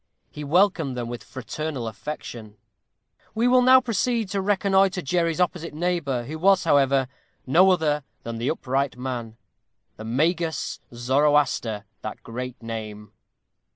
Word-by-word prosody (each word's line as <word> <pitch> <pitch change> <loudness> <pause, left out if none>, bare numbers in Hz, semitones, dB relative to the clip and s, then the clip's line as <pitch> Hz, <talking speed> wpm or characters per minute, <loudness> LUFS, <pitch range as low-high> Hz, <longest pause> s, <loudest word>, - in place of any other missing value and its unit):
He 150 - -7
welcomed 165 -4 +2
them 120 -1 -3
with 120 0 -6
fraternal 130 -1 -5
affection. 110 -2 -7 0.8
We 230 +2 +2
will 250 0 +5
now 260 +1 +7
proceed 230 -2 -1
to 200 0 -1
reconnoitre 195 -2 +2
Jerry's 170 +2 0
opposite 175 -3 -1
neighbor, 155 -7 -1
who 155 +6 -7
was, 190 +2 +4
however, 135 -2 +3 0.4
no 175 +9 +5
other 150 -5 +2 0.2
than 115 -1 -5
that 120 - -1
Upright 135 -3 -1
Man, 120 -3 -5 0.6
The 110 - -8
Magus 160 +7 0
Zoroaster, 125 -3 +1 0.2
that - - -7
great 125 +1 -6
name. 105 -2 -6
150 Hz, 130 wpm, -24 LUFS, 120-180 Hz, 0.8 s, now